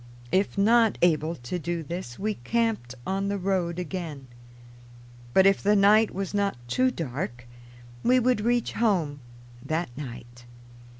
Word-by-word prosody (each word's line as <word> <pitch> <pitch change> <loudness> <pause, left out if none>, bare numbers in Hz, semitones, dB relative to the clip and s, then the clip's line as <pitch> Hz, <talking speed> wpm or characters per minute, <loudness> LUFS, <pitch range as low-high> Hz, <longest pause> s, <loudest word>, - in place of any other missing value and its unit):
If 195 +2 +1
not 225 +2 +4
able 160 -1 +2
to 165 +7 -5
do 170 0 -3
this, 160 -6 -6
we 215 +2 -1
camped 210 - -1
on 195 +1 -1
the 200 0 -1
road 180 -3 -1
again. 170 -6 -5 1.1
But 190 +9 +5
if 195 0 +4
the 205 +1 +3
night 210 +2 +5
was 195 +1 -4
not 200 -7 0
too 255 - +2
dark 125 - -5 0.6
we 255 +1 +4
would 250 -2 +2
reach 240 +1 +1
home 175 -11 +1 0.4
that 160 -6 -3
night. 120 -3 -9
185 Hz, 140 wpm, -26 LUFS, 150-210 Hz, 1.1 s, But